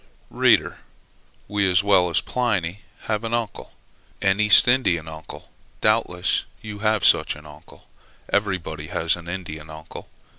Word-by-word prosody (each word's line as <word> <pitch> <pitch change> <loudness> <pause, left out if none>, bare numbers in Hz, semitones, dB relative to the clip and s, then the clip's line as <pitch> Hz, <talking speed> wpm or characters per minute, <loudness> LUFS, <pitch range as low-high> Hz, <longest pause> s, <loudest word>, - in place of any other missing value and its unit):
Reader! - - +2 0.7
we, 100 -1 +1
as 90 +1 +3
well 95 -3 +4
as 85 - +1
Pliny, 100 -7 -2 0.2
had 110 0 -2
an 115 +1 -1
uncle, 115 -3 -5 0.5
an 95 +1 +1
East 105 +1 +7
Indian 95 -11 +2
uncle; 80 0 -10 0.3
doubtless 90 0 +1 0.2
you 105 -1 -8
have 110 -1 +1
such - - +4
an 75 0 -14
uncle; 75 0 -16 0.5
everybody 90 -7 -1
has 80 0 0
an 85 -1 -10
Indian 80 -4 -7
uncle. 80 0 -11
95 Hz, 140 wpm, -23 LUFS, 80-105 Hz, 0.7 s, East